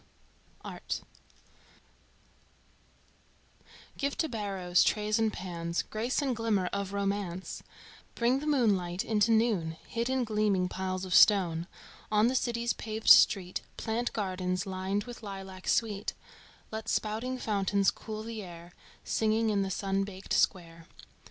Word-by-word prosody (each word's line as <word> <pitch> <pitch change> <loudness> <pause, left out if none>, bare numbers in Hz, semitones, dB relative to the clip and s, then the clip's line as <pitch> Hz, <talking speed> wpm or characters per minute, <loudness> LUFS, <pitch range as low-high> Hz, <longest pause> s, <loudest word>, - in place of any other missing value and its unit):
XII. - - -34
ART - - -4 3.0
Give 280 0 -1
to 320 - +1
barrows 195 - +1
trays 215 +1 +1
and 220 -1 +2
pans 170 -3 -3
Grace 235 +7 -1
and 260 -3 0
glimmer 220 -4 +1
of 200 -1 -2
romance, 200 -2 -3 0.5
Bring 245 +3 +2
the 300 - -5
moonlight 195 -11 +1
into 215 0 +2
noon 215 -8 +2
Hid 235 +1 -2
in 260 -1 +1
gleaming 210 -4 +1
piles 185 0 -3
of 185 - -3
stone; 175 -5 +5 0.4
On 210 0 +4
the - - -1
city's 235 -2 0
paved 220 0 -3
street 185 -3 +6 0.2
Plant 235 +2 -1
gardens 185 -3 -2
lined 190 +1 -2
with 240 +1 -9
lilac 195 -2 -8
sweet, 210 -3 0 0.6
Let 220 0 -5
spouting 225 +4 -1
fountains 200 -3 +1
cool 215 -1 -7
the 225 -1 -6
air, 175 -2 -10 0.3
Singing 220 0 +1
in 200 -1 +1
the 195 - -1
sun 195 +1 0
baked 195 -1 -6
square. 165 -3 0
205 Hz, 130 wpm, -30 LUFS, 185-225 Hz, 3.0 s, street